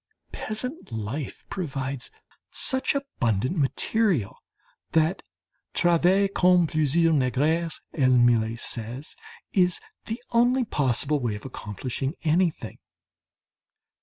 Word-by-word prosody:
Peasant 250 - -3
life 115 +6 -5
provides 135 -7 -4 0.4
such 260 +1 +2
abundant 130 - -1
material 155 - +1 0.5
that 160 +4 +2 0.5
"travailler 175 +3 +4
comme 180 -2 +4
plusieurs 160 +2 +2
nègres," 155 +5 +1
as 135 -5 +3
Millet 115 -2 +3
says, 120 +6 -6 0.4
is 180 -2 +3 0.3
the 225 +2 -4
only 245 +2 +3
possible 145 - +1
way 120 -5 -2
of 105 - -10
accomplishing 130 - -4
anything. 165 +1 0
155 Hz, 95 wpm, -26 LUFS, 125-185 Hz, 0.5 s, travailler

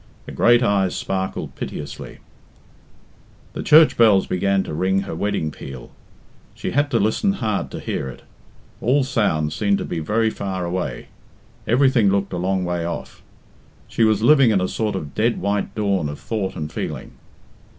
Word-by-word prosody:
Her - - -9
great 120 +1 +4
eyes 100 -4 +1
sparkled 95 0 -3
piteously. 75 - -7 1.4
The - - -4
church 155 +1 +6
bells 105 -5 +5
began 95 +1 +1
to - - -6
ring 95 +4 +1
her 95 - -6
wedding 80 -3 -1
peal. 65 -4 -10 0.6
She - - -4
had 145 +2 +1
to 120 -5 +1
listen 110 - +1
hard 110 - -2
to - - -7
hear 65 - -3
it. 65 - -11 0.6
All 135 +4 +3
sounds 90 - 0
seemed 100 +3 +1
to - - -4
be 85 - -3
very 110 +7 +1
far 95 -3 -4
away; 90 +1 -4 0.6
everything 125 -3 +4
looked 100 0 0
a - - -2
long 95 +1 0
way 90 -1 -2
off. 85 0 -6 0.7
She 115 - 0
was 110 -1 +3
living 135 -1 +6
in 105 -3 +3
a 90 - 0
sort 110 0 -2
of 75 -6 -5
dead 115 +2 +1
white 100 0 -2
dawn 100 -7 0
of 75 - -7
thought 100 -4 -3
and 75 -3 -5
feeling. - - -5
100 Hz, 170 wpm, -21 LUFS, 90-115 Hz, 1.4 s, church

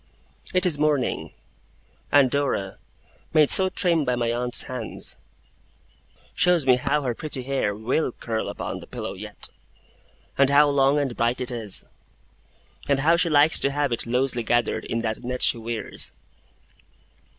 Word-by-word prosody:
It 185 +1 +1
is 160 -5 0
morning; 150 -4 0 0.8
and 140 -3 +4
Dora, 135 -9 -2 0.6
made 150 -2 +6
so 190 0 +9
trim 170 -4 0
by 125 -2 0
my 120 -1 -1
aunt's 120 0 -1
hands, 125 -3 -6 1.2
shows 180 -5 +2
me 130 -1 +5
how 140 +4 -1
her 125 -2 -1
pretty 140 0 -3
hair 130 -6 -1
will 125 +7 -1
curl 115 -1 -4
upon - - -5
the - - -13
pillow - - -6
yet, - - -3 0.9
an 140 - +5
how 145 +1 +5
long 140 0 +2
and 135 -4 -2
bright 120 +1 0
it 125 0 -3
is, 110 -5 -2 1.0
and 140 -1 +2
how 165 +4 +4
she 170 0 +1
likes 150 +1 +4
to 140 - +1
have 145 -1 -1
it 120 - -2
loosely 125 0 0
gathered 120 +1 0
in 115 - -3
that 110 -1 -3
net 125 +1 -3
she 115 - +3
wears. 115 0 -4
135 Hz, 155 wpm, -24 LUFS, 120-145 Hz, 1.2 s, so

